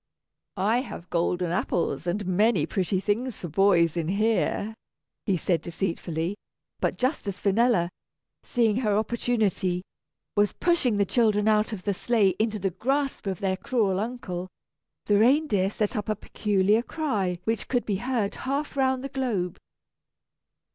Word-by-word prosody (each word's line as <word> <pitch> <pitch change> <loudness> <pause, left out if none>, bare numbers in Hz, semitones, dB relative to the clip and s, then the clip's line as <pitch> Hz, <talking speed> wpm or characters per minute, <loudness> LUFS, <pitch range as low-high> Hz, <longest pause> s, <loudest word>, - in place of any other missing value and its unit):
"I 210 +5 +2
have 180 -9 -9
golden 175 0 0
apples 175 -1 -1
and 195 +4 -1
many 210 +6 +3
pretty 190 -1 0
things 220 +5 -1
for 175 - -6
boys 170 -1 +3
in 165 -2 -1
here," 215 +2 +1 0.5
he 190 -3 +2
said 170 0 0
deceitfully; 170 0 -2 0.5
but - - 0
just 255 -3 -1
as 200 0 -3
Finella, 215 -2 +3 0.6
seeing 230 -3 +1
her 210 -5 +1
opportunity, 215 -5 0 0.5
was 205 -1 +3
pushing 330 -11 +1
the 200 - +3
children 215 -1 +2
out 215 +1 +3
of 200 -4 -6
the 200 - 0
sleigh 205 -1 +2
into 220 0 +1
the 195 -1 -1
grasp 270 +5 -1
of 190 -3 -3
their 190 -1 0
cruel 200 -5 0
uncle, 205 -6 -4 0.6
the 205 -1 +3
reindeer 230 -5 +3
set 210 +3 -2
up 210 0 -3
a 215 - +1
peculiar 210 +1 +1
cry 215 - -1
which 225 0 -1
could 245 -2 0
be 200 -3 0
heard 235 -2 -1
half 280 +3 -3
round 265 -1 +1
the 275 - -4
globe. 235 -10 -2
210 Hz, 150 wpm, -26 LUFS, 185-235 Hz, 0.6 s, many